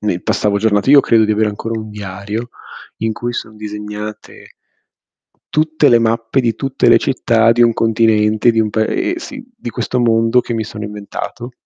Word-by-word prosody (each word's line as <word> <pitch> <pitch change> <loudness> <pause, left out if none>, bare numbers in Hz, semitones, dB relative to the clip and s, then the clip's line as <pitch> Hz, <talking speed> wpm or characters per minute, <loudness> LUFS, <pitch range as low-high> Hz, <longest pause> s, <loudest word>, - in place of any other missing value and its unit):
ne 95 -4 -2
passavo 105 -1 0
giornate 105 +3 +1
io 145 0 +8
credo 115 -4 +3
di 105 - -1
avere 110 0 +1
ancora 115 +2 -4
un 110 0 -7
diario 105 +3 -6 0.5
in 110 0 -1
cui 120 +3 -4
sono 110 -2 -6
disegnate 105 0 -8 1.0
tutte 155 -1 +2
le 120 - +5
mappe 115 +3 0
di 115 -3 0
tutte 135 -1 0
le - - +7
città 115 -3 +2
di 120 +1 +3
un 115 - +4
continente, 110 0 +2
di 115 - -1
un 105 -1 0
pae 110 - -1
sì, 270 -5 -8
di 120 - -6
questo 125 +4 -3
mondo 115 +1 +3
che 120 - -6
mi 110 -1 -2
sono 105 0 -7
inventato, 105 +4 -7
110 Hz, 180 wpm, -16 LUFS, 105-120 Hz, 1.0 s, io